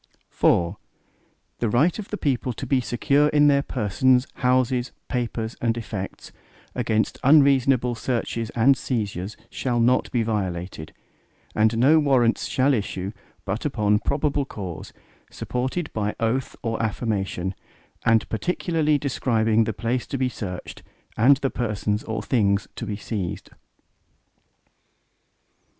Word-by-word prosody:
IV 85 +3 +2 0.8
The 115 - 0
right 145 - +2
of 210 - -6
the 210 - -4
people 130 - -1
to 135 - -6
be 130 0 +2
secure 140 +5 +2
in 150 0 +4
their 140 -1 +5
persons, 125 +1 +2
houses, 125 -1 +1 0.2
papers, 120 -2 -2
and 115 -1 +1
effects, 105 -4 -6 0.4
against 110 -3 0
unreasonable 135 -3 +4
searches 115 -1 -2
and 125 +4 +5
seizures, 105 -6 -3
shall 120 -2 -1
not 125 +2 +2
be 120 -2 +1
violated, 90 -7 -3 0.6
and 110 +1 +2
no 145 +7 +5
Warrants 130 -6 +2
shall 135 +2 +2
issue, 100 -4 -2 0.3
but 105 +3 -3
upon 105 -7 +1
probable 145 +2 0
cause, 95 - -7 0.4
supported 130 +6 -3
by 105 -1 -1
oath 120 +3 -1
or 115 -1 -1
affirmation, 100 -4 -2 0.5
and 115 -1 +3
particularly 155 - 0
describing 115 -5 +1
the 110 - -1
place 120 +3 -2
to 135 - -3
be 130 -1 +1
searched, 90 -6 -7 0.3
and 130 +5 +5
the 135 0 -2
persons 105 -2 -2
or 110 - -3
things 100 -5 +1
to 115 - -5
be 105 - -2
seized. 100 -5 -5
120 Hz, 130 wpm, -24 LUFS, 105-135 Hz, 0.8 s, their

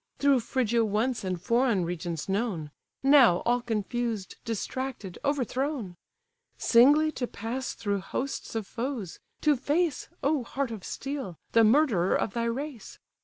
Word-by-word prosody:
Through 280 -2 +4
Phrygia 235 -1 +1
once 225 +3 0
and 185 -2 -2
foreign 230 -1 +2
regions 170 -2 -4
known; 195 -7 -2 0.3
Now 270 -10 +6
all 245 +1 +2
confused, 225 -2 -3
distracted, 230 -3 -4
overthrown! 270 - -1 0.6
Singly 290 +6 +5
to 250 -5 -3
pass 240 +5 -4
through 200 -2 -1
hosts 260 +5 -4
of 220 -2 -2
foes! 235 -5 -4 0.2
to 300 -1 +4
face 295 +3 0
(O 280 -1 +2
heart 260 +1 -3
of 215 -5 -7
steel!) 270 - -5
the 230 - +5
murderer 220 - +4
of - - -1
thy 235 -1 -1
race! 250 -1 -5
235 Hz, 135 wpm, -28 LUFS, 205-270 Hz, 0.6 s, Now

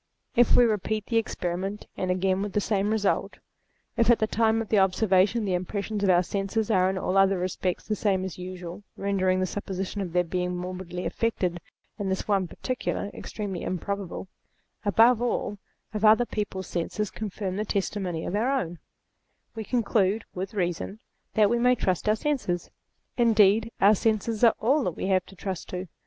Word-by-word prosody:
If 240 -1 +5
we - - +7
repeat 215 -1 -1
the 230 - 0
experiment, 195 -1 -2
and 185 - -2
again 185 +1 +1
with 205 -1 -3
the - - +2
same 205 0 0
result; 215 -2 0 0.6
if 230 0 +2
at 235 - +7
the 220 - +1
time 225 0 +2
of 225 - -4
the 210 - +4
observation 195 +3 +3
the 190 - 0
impressions 200 +3 -2
of 195 - +3
our 180 0 +5
senses 200 +4 -1
are 185 -2 +4
in 190 - -2
all 185 +1 0
other 195 0 +4
respects 180 0 -2
the 215 - 0
same 190 -2 +1
as 190 - -5
usual, 180 0 -7 0.2
rendering 190 -2 +1
the 185 - +1
supposition 195 +1 -4
of 180 -3 -4
their 180 +1 +2
being 180 +1 -2
morbidly 180 0 -5
affected 185 -6 -1 0.4
in 200 -1 -2
this 190 - -2
one 195 -3 +2
particular, 225 0 -3
ex - - -8
tremely 200 -5 -4
improbable; 195 +1 -4 0.6
above 225 +4 +5
all, 220 -4 -1 0.3
if 210 0 -3
other 220 +3 +6
people's 205 -4 -4
senses 190 +4 -3
confirm 200 -3 -4
the 210 - 0
testimony 195 -5 -2
of 185 - -2
our 225 +5 +1
own; 170 -4 -5 0.7
we 225 -1 -5
con 240 +2 0
clude, 205 0 +1
with 190 +3 -5
reason, 180 +2 -2 0.4
that 215 -1 +5
we 235 +3 +1
may 250 +1 +4
trust 185 -2 0
our 215 - +4
senses. 220 -10 -2 0.5
Indeed 225 -1 +4
our 200 +2 +6
senses 220 +1 0
are 230 - +6
all 275 +6 +2
that 175 - -2
we - - -3
have 185 -1 +2
to 195 - -14
trust 190 -1 -5
to. 180 +1 -5
200 Hz, 185 wpm, -27 LUFS, 185-220 Hz, 0.7 s, we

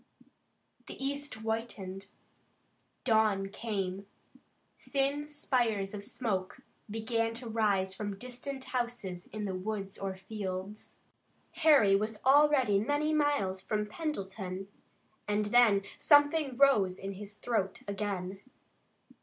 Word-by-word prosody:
The - - -7
east 280 +1 -2
whitened. 220 -4 -4 1.0
Dawn 215 -4 +3
came. 195 -3 -3 0.7
Thin 280 +1 -1
spires 240 -9 0
of 205 -1 -6
smoke 205 0 -3 0.3
began 225 +1 -1
to 240 +1 -7
rise 205 -4 +1
from 205 0 -4
distant 255 +4 -6
houses 235 -9 -3
in 215 -1 -5
the 195 - -2
woods 195 +1 -4
or 195 -1 -3
fields. 190 0 -6 0.6
Harry 300 - +5
was 215 +1 -1
already 270 -6 +5
many 290 +7 +1
miles 285 -12 +1
from 210 +2 -1
Pendleton, 195 - -4 0.6
and 210 0 +1
then 210 -3 +5 0.2
something 290 -3 +4
rose 210 -10 +4
in 195 +1 -5
his 205 +1 -8
throat 210 -5 -2
again. 195 -2 -3
215 Hz, 110 wpm, -31 LUFS, 195-255 Hz, 1.0 s, Harry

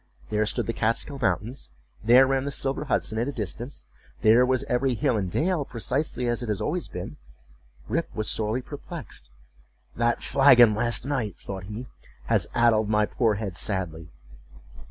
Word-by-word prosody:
There 105 0 +1
stood - - 0
the 115 - -2
Kaatskill 115 +6 -1
mountains—there 105 - +1
ran 135 0 0
the - - -1
silver 140 +2 -1
Hudson 110 -5 0
at 120 - 0
a - - -1
distance—there 120 0 0
was 130 -1 +1
every 125 +1 0
hill 135 0 +1
and 95 -4 -1
dale 165 - 0
precisely 125 +1 -2
as 120 0 -1
it 120 - -5
had 105 -3 -1
always - - -2
been—Rip 60 - -7
was 110 -1 -2
sorely 110 +4 0
perplexed—"That 95 - -6
flagon 125 -5 +6
last 120 +3 +1
night," 125 -9 -2
thought 95 -2 -7
he, 105 +5 -7 0.4
"has - - +1
addled 115 -3 +3
my 105 0 +3
poor 110 -1 +1
head 100 -3 -4
sadly!" 85 -4 -3
115 Hz, 150 wpm, -25 LUFS, 100-130 Hz, 0.4 s, flagon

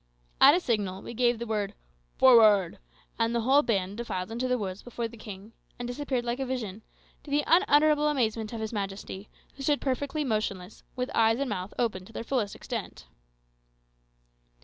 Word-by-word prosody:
At 280 +3 +9
a - - +2
signal 205 - -2
we - - -7
gave 240 0 +2
the 235 - -5
word 210 -2 -2 0.4
"Forward!" 215 -8 +6 0.4
and 230 +1 +1
the 235 - +1
whole 270 +5 +5
band 200 -6 -1
defiled 200 -4 -4
into 240 +3 -2
the 250 0 +1
woods 195 -3 -5
before 235 -1 -4
the 230 - -13
king, 210 -1 -10 0.2
and 245 - -5
disappeared 250 -1 -2
like 240 +2 -2
a 270 - -1
vision, 225 -5 -4 0.4
to - - -12
the 290 +1 +2
unutterable 305 -4 +4
amazement 225 -6 0
of 230 -2 -5
his 220 +1 -4
majesty, 195 -1 -5 0.3
who - - -9
stood 290 +1 +1
perfectly 285 +3 -2
motionless, 215 -6 -3
with 250 0 -3
eyes 225 0 +3
and 275 0 -2
mouth 185 -1 -4
open 220 -6 -1
to 225 - -15
their - - -5
fullest 230 -5 -1
extent. - - -6
230 Hz, 180 wpm, -28 LUFS, 205-260 Hz, 0.4 s, At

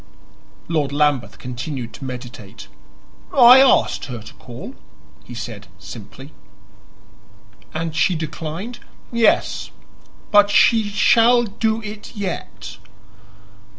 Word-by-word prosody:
Lord 155 -4 -1
Lambeth 145 -3 0
continued 125 -1 -6
to 135 - -9
meditate. 125 - -9 0.6
"I 250 -1 +8
asked 270 -1 +3
her 125 -3 -7
to - - -12
call," 120 -1 -10 0.5
he 120 - -11
said 110 -3 -8
simply. 125 +6 -11 1.4
"And 160 0 -4
she 170 +3 +2
declined?" 165 +8 -6 0.3
"Yes; 235 -2 +1 0.6
but 205 -1 +6
she 220 +1 +4
shall 235 +3 +4
do 220 +1 -2
it 210 +2 -9
yet." 200 -3 -6
160 Hz, 100 wpm, -20 LUFS, -, 1.4 s, I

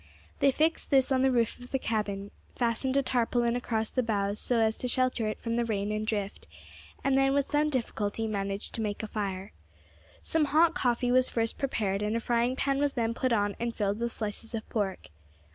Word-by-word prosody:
They 275 - +5
fixed 315 +4 +1
this 270 -1 +3
on 260 -1 +3
the 265 - +4
roof 235 -2 +1
of 245 0 -11
the 270 - 0
cabin, 205 -4 -2 0.2
fastened 250 +3 0
a 275 - +3
tarpaulin 240 -1 +1
across 225 -3 -1
the 255 - +1
boughs 205 -3 0
so 245 - +1
as 220 -1 +2
to 250 - -3
shelter 255 -2 +1
it 215 - -3
from 230 0 -2
the 240 - +2
rain 205 -2 -1
and 215 0 -2
drift, 205 -3 -3 0.6
and 275 -1 +2
then, 270 0 +4
with 280 -1 +2
some 300 +1 +1
difficulty, 225 -5 -2
managed 200 -1 -2
to 225 - -3
make 210 0 -3
a - - -3
fire. 200 -2 -4 0.7
Some 320 -2 +2
hot 320 +4 +4
coffee 245 -2 +1
was 255 0 +4
first 230 -1 -1
prepared, 205 -7 -1
and 210 +1 0
a - - +1
frying 240 +2 +1
pan 275 0 0
was 285 -1 +1
then 230 -2 0
put 255 +2 -1
on 205 -3 +1
and 235 0 -2
filled 205 0 -1
with 235 0 -1
slices 220 +2 -4
of 220 - -5
pork. 200 - -2
230 Hz, 210 wpm, -29 LUFS, 210-255 Hz, 0.7 s, They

